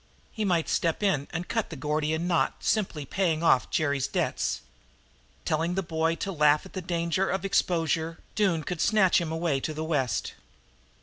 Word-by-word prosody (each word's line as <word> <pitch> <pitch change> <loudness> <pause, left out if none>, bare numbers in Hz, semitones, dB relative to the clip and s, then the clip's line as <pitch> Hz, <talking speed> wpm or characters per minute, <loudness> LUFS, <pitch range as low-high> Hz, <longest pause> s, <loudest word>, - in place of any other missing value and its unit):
He 220 - -3
might 175 -5 +1
step 165 +4 0
in 150 -9 +1
and 175 +2 -4
cut 225 -2 -1
the 165 - -7
Gordian 155 +4 -1
knot 175 -2 +1
by - - -18
simply 185 -9 0
paying 165 0 0
off 130 -6 +4
Jerry's 140 -3 0
debts. - - -1 0.8
Telling 165 +3 0
the 195 - 0
boy 165 -1 0
to 195 +3 -4
laugh 150 -2 +3
at 190 - -13
the 185 - -4
danger 170 +2 0
of 190 +1 -1
exposure, 165 -3 0 0.2
Doone 185 -7 +1
could 175 +1 -3
snatch 200 -5 +4
him 165 -2 -3
away 160 -4 0
to 155 +3 -4
the 155 - -3
West. 145 -7 -1
165 Hz, 180 wpm, -27 LUFS, 155-185 Hz, 0.8 s, off